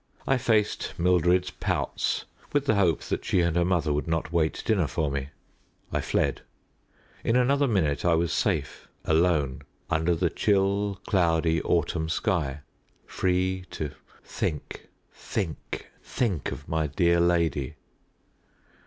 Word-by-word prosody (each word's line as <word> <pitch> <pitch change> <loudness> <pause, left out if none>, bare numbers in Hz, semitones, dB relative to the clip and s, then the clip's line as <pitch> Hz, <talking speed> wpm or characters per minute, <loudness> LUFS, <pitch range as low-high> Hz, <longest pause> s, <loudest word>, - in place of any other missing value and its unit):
I 135 - +3
faced 110 -3 +1
Mildred's 90 +1 +3
pouts - - -1 0.3
with 145 -1 +2
the 125 - +3
hope 95 -6 +2
that - - -3
she 90 - +2
and 85 -1 +1
her 85 - +3
mother 85 -4 +1
would 75 +2 -2
not 80 0 -1
wait 80 -2 +1
dinner 100 -8 +2
for 75 0 -1
me. 70 0 -3 0.6
I - - +1
fled. - - 0 0.8
In 115 - +1
another 140 +3 +3
minute 80 - +1
I 85 -1 +4
was 85 0 0
safe, - - -1 0.2
alone, 80 -5 +2 0.3
under 80 +2 +2
the 85 0 0
chill, 100 0 +1
cloudy 80 -3 +2
autumn 80 -1 0
sky 80 -7 -1 0.4
free 95 0 0
to 75 -2 -4 0.3
think, 75 -3 -4 0.3
think, 95 -8 -4 0.2
think 95 - -1
of 75 - -8
my 80 -1 0
dear 85 +3 +2
lady. 85 -4 +1
85 Hz, 135 wpm, -27 LUFS, 80-95 Hz, 0.8 s, I